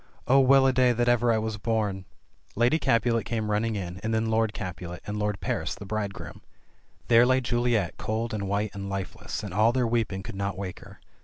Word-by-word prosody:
Oh, 135 +2 +6
well 135 0 +6
a 130 - +4
day 125 -1 +4
that 120 +1 0
ever 120 -1 +3
I 115 - +2
was 110 -1 -2
born 105 -4 -1 0.2
!" - - -39 0.2
Lady 120 +8 +3
Capulet 115 -2 +2
came 110 -1 -2
running 110 +1 0
in, 90 -2 -5
and 110 - -2
then 110 0 0
Lord 110 -1 +2
Capulet, 90 -3 -6
and 105 0 -4
Lord 105 -1 -1
Paris, - - -2
the 100 - -10
bridegroom. 100 -1 -5 0.7
There 115 0 +6
lay 130 +1 +4
Juliet 120 -6 0
cold 110 +1 -3
and 100 -2 -3
white 100 +1 -1
and 100 0 -6
lifeless, 95 -1 -5
and - - -6
all 110 +4 +4
their 125 0 +1
weeping 115 -5 -1
could - - -7
not 100 -1 -3
wake 95 -2 -5
her. - - -14
110 Hz, 215 wpm, -27 LUFS, 100-120 Hz, 0.7 s, Oh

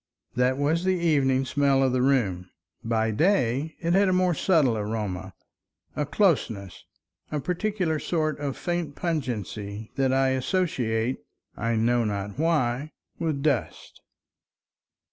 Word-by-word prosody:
That 125 +1 +2
was 155 +5 +1
the 185 0 +2
evening 140 -6 +2
smell 135 0 +2
of 130 - +2
the 130 - +2
room. 100 -10 +1 0.3
By 110 -1 +1
day 140 - +1
it 170 0 0
had 195 +1 +4
a - - +2
more 180 -1 +3
subtle 155 -8 +3
aroma, 105 -4 -4 0.6
a 150 - -1
closeness, 125 - 0 0.5
a 150 - -1
peculiar 180 +1 -1
sort 155 -1 -1
of 140 -2 -3
faint 175 -5 -3
pungency 110 - -4
that 135 -1 +2
I 135 0 +3
associate—I 125 - -2
know 120 +2 +2
not 100 +2 -3
why—with 150 0 -1
dust. 150 -2 -2
135 Hz, 125 wpm, -26 LUFS, 115-160 Hz, 0.6 s, had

